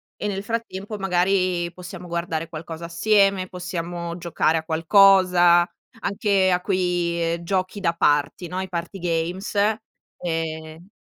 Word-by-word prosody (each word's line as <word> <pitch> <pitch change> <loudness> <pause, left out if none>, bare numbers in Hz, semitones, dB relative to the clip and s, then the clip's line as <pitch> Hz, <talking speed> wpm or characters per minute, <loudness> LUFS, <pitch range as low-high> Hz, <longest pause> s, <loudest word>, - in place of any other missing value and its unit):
e - - -6
nel 195 -1 -2
frattempo 215 -2 -4
magari 180 -2 +1
possiamo 180 0 -9
guardare 170 -1 -3
qualcosa 160 +1 -7
assieme, 195 +2 +2
possiamo 175 -1 -5
giocare 170 -2 +1
a 160 - -3
qualcosa. 175 +1 +5 0.4
Anche 200 -2 +1
a 180 -1 +2
quei, 175 -3 0
ehm, 170 0 -5
giochi 185 +2 -1
da 170 -4 +1
party, 145 +1 +1
no, 180 +2 -4
i 190 - -4
party 175 +1 -5
games; 175 +2 -2 0.7
ehm 160 0 -4
175 Hz, 130 wpm, -23 LUFS, 170-190 Hz, 0.7 s, qualcosa